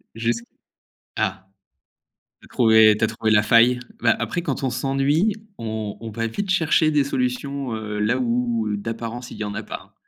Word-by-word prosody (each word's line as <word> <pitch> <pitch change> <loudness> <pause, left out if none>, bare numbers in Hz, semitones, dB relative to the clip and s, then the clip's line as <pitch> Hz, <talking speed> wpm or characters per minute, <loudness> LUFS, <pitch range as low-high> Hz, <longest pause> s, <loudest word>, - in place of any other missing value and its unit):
Jusqu 115 +1 -1 0.7
ah! 95 0 -2 1.0
Tu - - -17
as - - -19
trouvé, 110 -2 +5
tu - - +2
as - - +5
trouvé 110 -1 -1
la 105 -1 +5
faille. 120 +3 +4 0.2
Bah 115 - +4
après 175 - -2
quand 170 - -3
on 130 - +1
s'ennuie, 140 - +1 0.3
on 110 -2 -4
on 115 -1 -6
va 115 +1 -2
vite 195 - -3
chercher 160 -3 +3
des 145 -2 +2
solutions, 130 -1 -2
heu, 105 -1 -5
là 115 +5 +1
où 120 -2 0
heu, 105 - -1
d'apparence 115 +3 -5
il - - -10
y 110 - -3
en 105 0 -5
a - - -4
pas. - - -9
115 Hz, 190 wpm, -22 LUFS, 110-135 Hz, 1.0 s, trouvé